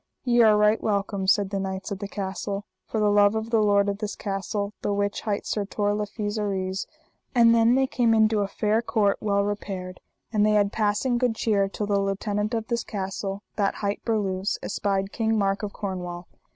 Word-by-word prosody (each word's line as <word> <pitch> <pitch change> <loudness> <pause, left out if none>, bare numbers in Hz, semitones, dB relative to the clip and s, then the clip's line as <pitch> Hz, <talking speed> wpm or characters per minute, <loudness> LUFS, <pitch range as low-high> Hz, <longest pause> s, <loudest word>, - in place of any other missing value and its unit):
Ye 240 -1 +4
are 215 -2 +6
right 210 +1 +3
welcome, 200 -2 -1
said 200 0 +3
the 195 - -1
knights 190 +1 -4
of 195 - -3
the 200 - -4
castle, 200 +1 -4 0.2
for 220 - -2
the 210 -1 +3
love 205 +1 +5
of 220 +1 -3
the 225 -2 +4
lord 205 -1 +3
of 200 0 -2
this 210 -1 -4
castle, 200 +1 -3
the - - -1
which 200 0 -1
hight 205 -2 -2
Sir 210 - -1
Tor 205 +1 -1
le 210 0 -2
Fise 210 +1 -3
Aries. 190 -2 -2 0.5
And 230 -1 +6
then 230 +1 +4
they 265 0 +3
came 235 -3 +2
into 220 -1 +3
a 200 - 0
fair 210 +2 0
court 215 -4 +1
well 200 -1 +1
repaired, 195 -3 -4 0.3
and 210 -1 +3
they 215 0 +4
had 205 -1 +3
passing 220 +3 +1
good 245 -3 +1
cheer, 205 -3 +1
till 210 - -3
the 200 -1 +1
lieutenant 205 +3 -1
of 225 -1 -2
this 235 -1 -1
castle, 195 0 -4
that 200 -2 +1
hight 200 0 -3
Berluse, 200 -3 -1
espied 195 -1 -1
King 225 -1 0
Mark 195 0 +1
of 210 -1 -4
Cornwall. 180 -4 -5
205 Hz, 205 wpm, -25 LUFS, 195-220 Hz, 0.5 s, are